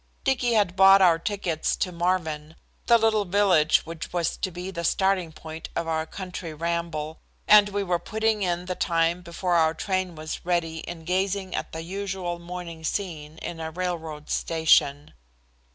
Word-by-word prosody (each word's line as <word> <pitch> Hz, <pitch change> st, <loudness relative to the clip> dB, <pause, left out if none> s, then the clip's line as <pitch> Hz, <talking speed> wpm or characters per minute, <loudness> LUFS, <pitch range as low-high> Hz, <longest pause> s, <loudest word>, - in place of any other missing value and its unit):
Dicky 250 Hz, -3 st, +1 dB
had 205 Hz, -5 st, +2 dB
bought 195 Hz, +1 st, +8 dB
our 175 Hz, -3 st, +5 dB
tickets 175 Hz, -4 st, -1 dB
to 185 Hz, -, -2 dB
Marvin, 165 Hz, -3 st, -1 dB, 0.3 s
the 235 Hz, -, +7 dB
little 220 Hz, -2 st, +2 dB
village 185 Hz, -5 st, +3 dB
which 165 Hz, -1 st, -7 dB
was 175 Hz, -2 st, 0 dB
to -, -, -2 dB
be 180 Hz, +2 st, -6 dB
the 170 Hz, -2 st, -5 dB
starting 190 Hz, -1 st, +1 dB
point 160 Hz, 0 st, -9 dB
of 165 Hz, -, -2 dB
our 160 Hz, -1 st, -1 dB
country 180 Hz, -4 st, -7 dB
ramble, 165 Hz, -1 st, -3 dB, 0.3 s
and 210 Hz, -1 st, +7 dB
we 200 Hz, 0 st, -1 dB
were 175 Hz, -2 st, 0 dB
putting 220 Hz, +1 st, 0 dB
in 175 Hz, -1 st, -1 dB
the 185 Hz, -, -2 dB
time 170 Hz, 0 st, +1 dB
before 175 Hz, +1 st, -2 dB
our 160 Hz, -1 st, +3 dB
train 185 Hz, 0 st, -2 dB
was 155 Hz, 0 st, -6 dB
ready 170 Hz, -2 st, 0 dB
in 165 Hz, 0 st, -8 dB
gazing 190 Hz, +1 st, -1 dB
at -, -, -3 dB
the 160 Hz, 0 st, -5 dB
usual 190 Hz, -1 st, -4 dB
morning 170 Hz, -2 st, -7 dB
scene 160 Hz, -4 st, -4 dB
in 170 Hz, -, -5 dB
a 160 Hz, 0 st, -4 dB
railroad 160 Hz, -3 st, -4 dB
station. 150 Hz, -3 st, +2 dB
175 Hz, 170 wpm, -25 LUFS, 160-190 Hz, 0.3 s, bought